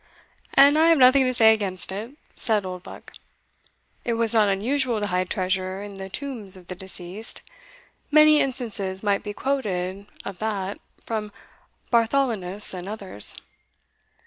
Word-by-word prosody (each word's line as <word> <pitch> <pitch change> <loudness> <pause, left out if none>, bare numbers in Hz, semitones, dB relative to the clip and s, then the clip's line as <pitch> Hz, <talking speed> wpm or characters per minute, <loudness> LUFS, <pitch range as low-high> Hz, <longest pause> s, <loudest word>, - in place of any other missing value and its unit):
"And 285 +3 +7
I 325 - +5
have 330 - +6
nothing 260 +1 +6
to 255 - +1
say 220 -2 +7
against 190 -4 -3
it," 225 +9 -6 0.2
said 215 -4 +1
Oldbuck: 180 -1 -9 0.9
"it 235 - -1
was 230 -1 0
not 215 -3 +4
unusual 240 +4 0
to 205 - -1
hide 180 0 -1
treasure 185 +1 -2
in 200 -1 -9
the 190 0 -7
tombs 220 -5 -5
of 180 -1 -17
the - - -3
deceased 190 +3 -6 0.7
many 305 0 +6
instances 210 -7 -2
might 200 -1 +1
be 205 - -6
quoted 200 -8 -2 0.2
of 195 -2 -7
that 205 -3 -3 0.3
from 215 -2 -3 0.6
Bartholinus 225 -6 +1
and 185 +1 -6
others." 195 - -1
210 Hz, 145 wpm, -24 LUFS, 190-245 Hz, 0.9 s, And